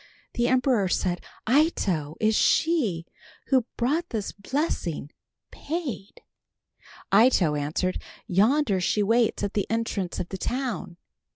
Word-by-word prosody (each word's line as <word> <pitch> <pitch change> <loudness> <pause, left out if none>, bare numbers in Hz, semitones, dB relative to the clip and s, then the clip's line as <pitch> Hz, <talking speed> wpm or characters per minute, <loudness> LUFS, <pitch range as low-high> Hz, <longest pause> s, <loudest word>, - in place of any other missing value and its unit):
The 240 0 +1
emperor 250 -6 +2
said, 180 -1 -1 0.3
"Ito, 200 - +1
is 215 0 +2
she, 230 - +2 0.4
who 260 -3 +3
brought 305 +8 0
this 215 -4 -3
blessing, 200 - -3 0.4
paid?" 290 - -5 0.9
Ito 200 -7 +5
answered, 150 +5 -2 0.2
"Yonder 210 +2 +2
she 205 +4 +1
waits 225 0 +2
at 200 - -2
the 205 - -1
entrance 220 -5 -2
of 175 - -4
the 190 - -6
town." 245 -8 -3
215 Hz, 115 wpm, -26 LUFS, 185-260 Hz, 0.9 s, Ito